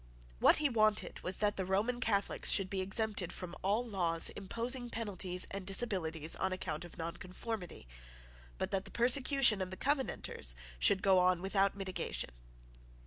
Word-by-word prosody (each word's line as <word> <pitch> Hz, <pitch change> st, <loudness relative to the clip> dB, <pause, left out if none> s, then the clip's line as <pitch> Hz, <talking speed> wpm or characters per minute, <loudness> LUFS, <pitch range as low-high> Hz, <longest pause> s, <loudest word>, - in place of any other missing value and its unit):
What -, -, +6 dB
he 305 Hz, -, +2 dB
wanted 215 Hz, -4 st, +1 dB
was 185 Hz, 0 st, -3 dB
that 205 Hz, -1 st, 0 dB
the 190 Hz, -, -1 dB
Roman 205 Hz, +7 st, 0 dB
Catholics 205 Hz, -5 st, 0 dB
should 195 Hz, -2 st, +4 dB
be 195 Hz, -1 st, -1 dB
exempted 195 Hz, -1 st, -1 dB
from 180 Hz, -1 st, -7 dB
all 210 Hz, +6 st, +1 dB
laws 175 Hz, -7 st, +2 dB
imposing 240 Hz, +5 st, -3 dB
penalties 190 Hz, -6 st, -2 dB
and 195 Hz, 0 st, -4 dB
disabilities 185 Hz, -6 st, +1 dB
on 190 Hz, -, -1 dB
account 175 Hz, -4 st, -4 dB
of 175 Hz, -, -12 dB
nonconformity, 180 Hz, -, -6 dB, 0.7 s
but -, -, -3 dB
that 195 Hz, 0 st, -1 dB
the -, -, -9 dB
persecution 250 Hz, -2 st, +4 dB
of 185 Hz, -, -3 dB
the 185 Hz, -, -7 dB
Covenanters 265 Hz, -, -1 dB, 0.2 s
should 190 Hz, -, +3 dB
go 190 Hz, -2 st, +5 dB
on 180 Hz, -1 st, +3 dB
without 195 Hz, +1 st, 0 dB
mitigation. 185 Hz, -, -3 dB
195 Hz, 155 wpm, -33 LUFS, 180-225 Hz, 0.7 s, What